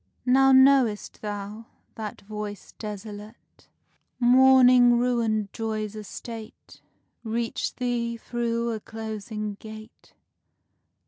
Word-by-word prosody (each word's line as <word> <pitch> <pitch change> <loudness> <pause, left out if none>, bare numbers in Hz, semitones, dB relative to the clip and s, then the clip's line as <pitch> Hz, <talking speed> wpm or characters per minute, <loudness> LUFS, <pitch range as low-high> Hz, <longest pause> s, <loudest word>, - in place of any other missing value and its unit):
Now 270 +1 +5
know'st 265 -5 +4
thou, 210 +2 -6 0.3
that 215 -2 -7
voice 210 -1 -7
desolate, 210 +1 -9 0.5
Mourning 250 -1 +6
ruined 230 -4 0
joy's 215 -2 -3
estate, 220 +1 -10 0.4
Reached 230 0 -3
thee 235 -2 -2
through 235 0 -2
a 220 - -3
closing 215 -1 -6
gate. 220 0 -12
225 Hz, 85 wpm, -25 LUFS, 215-245 Hz, 0.5 s, Mourning